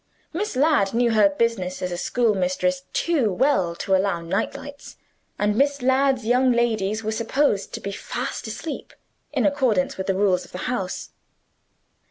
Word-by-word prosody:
Miss 390 -1 -2
Ladd 265 -8 +3
knew 240 0 +3
her 210 -2 +5
business 195 -3 -1
as 180 - -2
a - - -2
schoolmistress 230 +6 0
too 285 -11 +1
well 185 -5 +1
to 190 - -2
allow 190 -2 +1
night 180 +6 -2
lights; 285 0 -10 0.4
and 205 0 +1
Miss 280 +1 +1
Ladd's 260 -1 +2
young 250 +2 +3
ladies 220 -3 0
were 215 - -1
supposed 230 0 0
to - - -5
be 200 - -5
fast 200 - -5
asleep, 295 +8 -6 0.4
in - - 0
accordance 255 -10 +1
with 190 - -3
the 195 - +1
rules 190 -2 +2
of - - -16
the - - -4
house. 195 -7 -3
225 Hz, 165 wpm, -23 LUFS, 195-265 Hz, 0.4 s, her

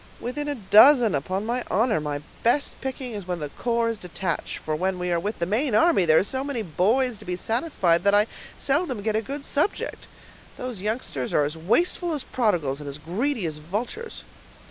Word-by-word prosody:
"Within 290 +5 -4
a 290 - -1
dozen, 230 - +6
upon 185 +8 -2
my 240 +2 -1
honor; 220 -2 +2
my 145 -1 -3 0.2
best 245 +5 +2
picking 260 -1 -4
is 205 -4 -6
when 180 -1 -2
the 150 -2 -4
corps 235 +8 0
is 225 -2 -3
detached; 180 0 -3
for 155 - -3
when 185 +3 -1
we 180 0 -2
are 170 - +2
with 205 +6 -3
the 170 - -1
main 220 - 0
army, 320 - +4
there 160 -1 +5
are - - +5
so 260 +6 -2
many 275 -5 -3
boys 215 - +1
to - - -13
be 180 - -2
satisfied, 195 - +1
that 200 0 +4
I 205 +1 +5 0.3
seldom 275 - 0
get 220 0 0
a 220 - +2
good 280 +5 -6
subject. 300 +8 -1 0.5
Those 250 -6 -5
youngsters 210 - -3
are 150 - +4
as 150 +2 -4
wasteful 320 - +1
as 295 - -2
prodigals, 175 - 0
and 145 -1 -6
as 140 - -6
greedy 210 - -2
as 155 -2 -3
vultures." 225 - -5
215 Hz, 205 wpm, -25 LUFS, 175-255 Hz, 0.5 s, dozen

